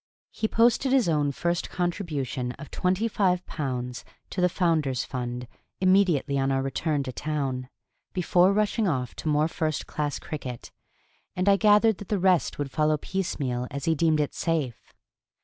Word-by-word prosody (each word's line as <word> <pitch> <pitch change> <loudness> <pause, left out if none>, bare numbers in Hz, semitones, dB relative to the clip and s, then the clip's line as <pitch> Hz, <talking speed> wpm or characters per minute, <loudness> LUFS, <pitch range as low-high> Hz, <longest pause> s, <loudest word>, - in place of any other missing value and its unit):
He 220 - -1
posted 235 +4 +3
his 260 -6 +4
own 150 -3 +2
first 170 +4 -1
contribution 155 -9 -2
of 150 - -11
twenty 185 +5 +1
five 185 -4 +1
pounds 125 -4 -4 0.3
to 185 - -2
the 180 - +4
Founder's 155 - +1
Fund 125 -1 -4 0.3
immediately 185 -7 +3
on 135 0 +1
our 135 0 +1
return 145 +2 -1
to 130 - -5
town, 135 -3 -3 0.4
before 180 0 +3
rushing 210 +1 +1
off 125 -7 -1
to - - -5
more 150 0 +3
first 155 -2 -2
class 145 -1 -2
cricket, 130 -6 -7 0.6
and 185 +2 -1
I 200 - +7
gathered 210 +1 +4
that 205 - -8
the 210 - +1
rest 185 -2 +2
would 145 -2 -3
follow 155 0 +2
piecemeal 140 -9 -2
as 140 +1 -5
he 165 - +3
deemed 160 0 +2
it 150 - 0
safe. 155 -9 -2
155 Hz, 165 wpm, -26 LUFS, 135-185 Hz, 0.6 s, I